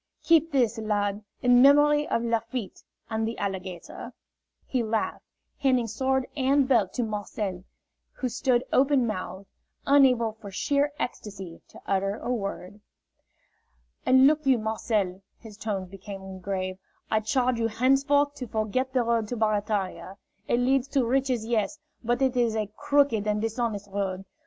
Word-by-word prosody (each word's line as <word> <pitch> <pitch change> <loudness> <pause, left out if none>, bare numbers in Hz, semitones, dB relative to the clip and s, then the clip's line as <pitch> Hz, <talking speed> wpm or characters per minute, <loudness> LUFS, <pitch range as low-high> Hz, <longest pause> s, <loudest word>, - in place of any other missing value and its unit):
"Keep 330 -1 +4
this 240 -5 +1
lad, 205 -1 -1 0.2
in 245 0 +6
memory 295 +2 +5
of 230 - 0
Lafitte 230 -1 -3 0.3
and 220 0 0
the 230 - -4
alligator," 190 -3 -5 0.5
he 255 - -1
laughed, 220 -1 -2 0.4
handing 260 -4 +2
sword 260 +4 0
and 275 0 +2
belt 225 -8 +3
to 245 - -1
Marcel, 205 -3 -4 0.5
who 255 - -3
stood 245 +1 +1
open 270 -1 +4
mouthed, 190 -2 -5 0.4
unable 255 -5 +4
for 215 -2 -11
sheer 285 +9 0
ecstasy 195 -7 -6
to - - -14
utter 195 +1 0
a 245 - -4
word. 200 -2 -5 1.2
"And 260 +1 +6
look 305 +2 +4
you, 260 -2 +5
Marcel," 215 -4 -1 0.2
his 220 -3 -12
tones 200 -3 -3
became 190 0 -9
grave, 185 0 -3 0.3
"I 220 - +3
charge 245 +3 0
you 225 - +2
henceforth 275 +5 +2
to 250 - -5
forget 225 +5 -1
the 255 -2 +2
road 230 -2 0
to 245 - -4
Barataria. 205 -3 -1 0.3
It 240 - +2
leads 260 +1 +2
to 270 -4 +1
riches, 255 -2 0
yes, 230 +5 0 0.3
but 240 +3 +1
it 260 -1 +1
is 235 -3 +2
a 210 -2 -2
crooked 280 -8 +2
and 210 0 +1
dishonest 220 -2 -2
road. 195 -1 -3
225 Hz, 150 wpm, -26 LUFS, 205-260 Hz, 1.2 s, in